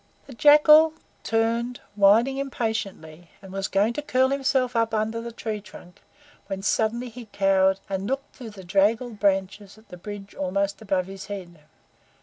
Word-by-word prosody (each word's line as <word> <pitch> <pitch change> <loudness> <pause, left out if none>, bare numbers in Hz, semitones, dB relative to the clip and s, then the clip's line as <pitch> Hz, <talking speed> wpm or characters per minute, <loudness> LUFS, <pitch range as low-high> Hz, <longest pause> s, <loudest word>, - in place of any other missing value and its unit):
The 275 - -12
Jackal 300 +4 +6 0.3
turned, 230 +2 -1
whining 215 +6 +4
impatiently, 200 - -4
and 190 -1 -12
was 195 0 -2
going 205 +4 +1
to 295 - -4
curl 260 -2 +2
himself 265 -2 0
up 230 -1 +1
under 220 +2 -1
the 235 0 -7
tree 220 -2 -5
trunk, 180 -3 -15 0.5
when 195 -1 -5
suddenly 230 +4 0
he 235 0 -11
cowered, 195 -1 +2
and 195 0 -3
looked 270 +2 -3
up - - -28
through 240 -3 -9
the 200 -3 -12
draggled 210 +5 +1
branches 195 +1 -1
at 220 - -21
the 180 - -10
bridge 200 +2 -9
almost 200 +2 -2
above 190 -3 -1
his 195 0 -9
head. 180 -5 -8
215 Hz, 165 wpm, -24 LUFS, 195-235 Hz, 0.5 s, Jackal